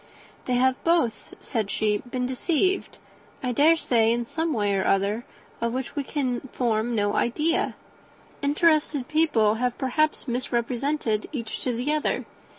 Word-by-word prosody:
"They 250 - 0
have 260 +1 +2
both," 330 -10 +1
said 220 -4 -2
she, 210 -1 +1
"been 250 +1 -4
deceived, 335 +9 0 0.5
I 250 - 0
dare 300 +7 +5
say, 230 -7 +2
in 235 0 0
some 320 +6 -2
way 205 -6 +1
or 190 - +1
other, 200 +4 +1 0.4
of 235 0 0
which 260 0 -4
we 285 - -1
can 260 -4 -1
form 235 -1 0
no 205 -1 +1
idea. 305 +8 +1 0.7
Interested 295 -2 +2
people 270 -9 +3
have 250 -1 0
perhaps 305 +4 0
misrepresented 240 -1 -1
each 230 -7 -5
to 250 -2 0
the 255 +6 0
other. 305 - 0
250 Hz, 150 wpm, -25 LUFS, 230-295 Hz, 0.7 s, dare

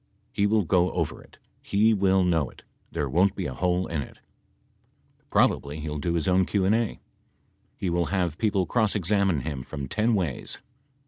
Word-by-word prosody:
He 100 - +1
will 105 0 +2
go 90 +1 +2
over - - -2
it. - - -19 0.2
He 110 +3 +3
will 95 -2 +3
know 80 -6 +1
it. - - -17 0.3
There 75 - -2
won't 90 +8 +2
be 95 - -3
a 65 - -3
hole 90 +5 0
in 80 -3 -2
it. - - -10 1.1
Probably 75 +2 +1
he 75 0 -5
will 75 0 -4
do 85 +3 -1
his 80 - -1
own 95 0 +4
Q 100 -2 +1
and 100 - +3
A. 115 -1 0 0.8
He 90 - -2
will 85 0 +1
have 90 -4 -1
people 100 -4 +1
cross 110 -1 +1
examine 100 -4 +1
him 70 -2 -4
from 70 +2 -6
ten 110 - +1
ways. 85 -10 -3
90 Hz, 190 wpm, -26 LUFS, 80-100 Hz, 1.1 s, own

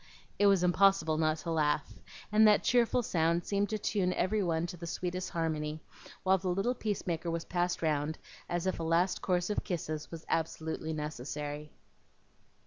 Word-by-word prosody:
It 205 - +6
was 195 -3 +4
impossible 180 -3 +3
not 155 0 +2
to 165 - -1
laugh, 150 -2 0 0.3
and 215 +1 +6
that 210 -1 +5
cheerful 245 0 +3
sound 170 -2 +1
seemed 200 0 0
to 215 - -1
tune 195 -3 0
every 210 +4 +1
one 165 -3 0
to 175 - -6
the 170 0 -8
sweetest 180 +2 -3
harmony, 155 -2 -2 0.4
while 190 0 +4
the 185 +1 -2
little 195 +7 +1
peacemaker 180 -7 -2
was 165 0 -2
passed 175 -1 -1
round 155 0 0 0.3
as 175 0 -1
if 185 - -1
a - - -2
last 170 +3 +2
course 180 +1 0
of - - -1
kisses 155 -4 -4
was 165 -1 -9
absolutely 160 0 -2
necessary. 150 0 -5
170 Hz, 170 wpm, -31 LUFS, 160-190 Hz, 0.4 s, It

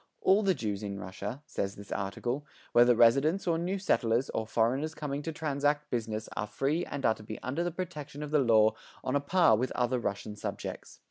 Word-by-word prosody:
"All 195 +3 +5
the 195 -3 +2
Jews 105 -5 -3
in 100 -1 -4
Russia," 100 +9 -6
says 100 -9 -3
this 100 0 -11
article, 120 +8 -2 0.3
"whether 120 0 +6
residents 135 - +4
or 165 -2 +1
new 180 +3 -1
settlers 125 - +1
or 110 - -2
foreigners 130 +8 +1
coming 145 -2 -3
to 165 - -4
transact 145 -1 -1
business 110 -2 -2
are 105 - -2
free 150 +10 0
and 140 -4 -4
are 110 - +5
to 110 - -13
be 110 0 -7
under 140 +7 -1
the 175 - 0
protection 150 -5 -6
of 150 - -6
the 150 - +4
law 110 -4 +5 0.3
on 130 - -1
a - - +4
par 165 -3 +4
with 125 +4 -1
other 125 0 +1
Russian 105 -1 -3
subjects." 105 - -6
130 Hz, 205 wpm, -30 LUFS, 110-155 Hz, 0.3 s, whether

